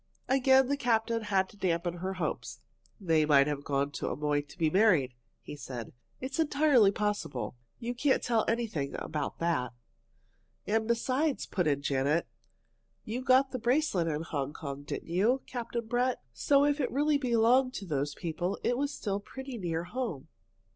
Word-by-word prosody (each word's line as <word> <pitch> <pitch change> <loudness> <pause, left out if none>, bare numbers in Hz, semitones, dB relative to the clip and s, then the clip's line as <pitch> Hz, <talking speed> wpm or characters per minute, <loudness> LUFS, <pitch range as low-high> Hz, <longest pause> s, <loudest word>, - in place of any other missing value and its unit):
Again 265 0 +5
the 285 +1 0
captain 230 -2 +1
had 195 -3 +1
to 205 - -17
dampen 175 -2 -1
her 190 +2 -3
hopes. 185 - -4 0.4
"They 165 -5 +2
might 145 -2 +5
have 145 -1 -3
gone 140 0 0
to - - -3
Amoy 145 +1 0
to 145 - -16
be 160 -3 +1
married," 180 - +4 0.3
he - - -7
said. 125 -5 -7 0.3
"It's 265 +4 -5
entirely 285 -8 +4
possible. 205 - -2 0.2
You 240 +1 -4
can't 265 +3 +1
tell 230 -2 +2
anything 220 -12 -1
about 150 -3 -4
that." 160 -8 -1 0.9
"And 220 +1 0
besides," 255 +5 0
put 180 -5 -1
in 140 -1 +1
Janet, 140 +4 +1 0.8
"you 235 +4 -3
got 260 +2 +4
the 255 - -3
bracelet 235 - +1
at 150 -2 -1
Hong 145 -3 -3
Kong, 140 -2 -6
didn't 145 - -6
you, 215 +10 +2
Captain 235 -1 -4
Brett? 245 +2 0
So 280 0 +3
if 290 0 +1
it 260 - 0
really 290 +2 +2
belonged 255 +1 +3
to 195 - -5
those 145 -3 -2
people, 175 +2 -3
it 245 +1 +1
was 285 0 0
still 200 -7 -3
pretty 265 +3 -8
near 170 -3 -2
home." 180 - -4
205 Hz, 170 wpm, -30 LUFS, 155-255 Hz, 0.9 s, Again